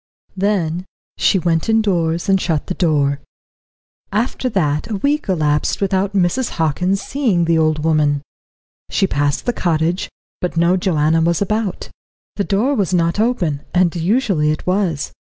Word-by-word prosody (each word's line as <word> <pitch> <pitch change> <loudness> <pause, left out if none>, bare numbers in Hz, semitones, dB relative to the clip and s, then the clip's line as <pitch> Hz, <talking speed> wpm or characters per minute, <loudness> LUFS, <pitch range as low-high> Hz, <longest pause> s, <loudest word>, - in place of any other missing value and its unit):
Then 185 -3 -1 0.3
she - - +3
went 170 +1 0
indoors 175 -7 +1
and 195 -1 +3
shut 160 -4 -1
the - - -3
door. 145 -5 +1 0.9
After 235 +4 -1
that 150 -7 0
a 215 - -2
week 285 +5 -1
elapsed 150 -5 +1
without 195 0 0
Mrs. 195 +7 +1
Hockin 170 +4 +1
seeing 205 -5 0
the 165 -1 +2
old 155 -1 +1
woman. 150 -3 +2 0.7
She - - +1
passed 145 -5 -1
the 245 - 0
cottage, 170 -1 0 0.3
but 180 -2 -3
no 170 +2 +3
Joanna 165 -3 +1
was 170 0 +1
about. 210 -1 -2 0.5
The 200 - 0
door 215 +8 +1
was 195 - 0
not 170 +2 +1
open, 185 - 0
and 180 -1 +3
usually 175 -3 +1
it 155 - -2
was. 180 -6 0
175 Hz, 150 wpm, -18 LUFS, 160-200 Hz, 0.9 s, she